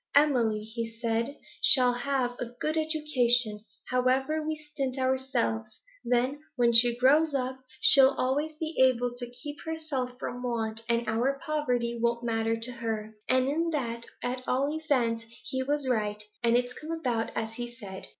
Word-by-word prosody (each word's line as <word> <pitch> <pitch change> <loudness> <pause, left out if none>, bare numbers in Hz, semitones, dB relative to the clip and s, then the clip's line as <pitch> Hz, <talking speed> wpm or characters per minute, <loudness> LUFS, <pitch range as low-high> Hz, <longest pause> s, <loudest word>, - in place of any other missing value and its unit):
"Emily," 240 -8 +3
he 225 +1 -5
said, 230 +3 -2 0.2
"shall 250 -2 +7
have 245 -1 -1
a 245 - -3
good 310 +1 -1
education, 255 -8 +1 0.3
however 260 +5 +1
we 310 0 -2
stint 295 -4 -4
ourselves; 260 - -1 0.2
then, 250 +4 0 0.2
when 240 -2 +3
she 235 +1 +8
grows 290 +4 +4
up, 260 0 -2 0.2
she'll 270 0 +7
always 290 +5 -1
be 315 +1 -5
able 245 -1 +3
to 245 -1 -7
keep 290 +4 -8
herself 295 -6 -4
from 245 -1 -6
want, 225 -3 -2
and 235 -1 +1
our 245 +5 0
poverty 250 -7 -1
won't 235 0 0
matter 225 -1 0
to 235 +2 -3
her." 220 -2 -4 0.2
And 255 0 +3
in 330 +4 0
that, 235 -5 -3 0.2
at 250 +1 -2
all 275 +4 0
events, 260 -8 0 0.2
he 260 0 -3
was 285 +1 -1
right, 210 -4 -1 0.2
and 235 0 +4
it's 245 0 -2
come 310 - -10
about 245 -9 -1
as 225 0 -3
he 240 -1 -5
said. 200 -6 -9
250 Hz, 160 wpm, -28 LUFS, 235-280 Hz, 0.3 s, she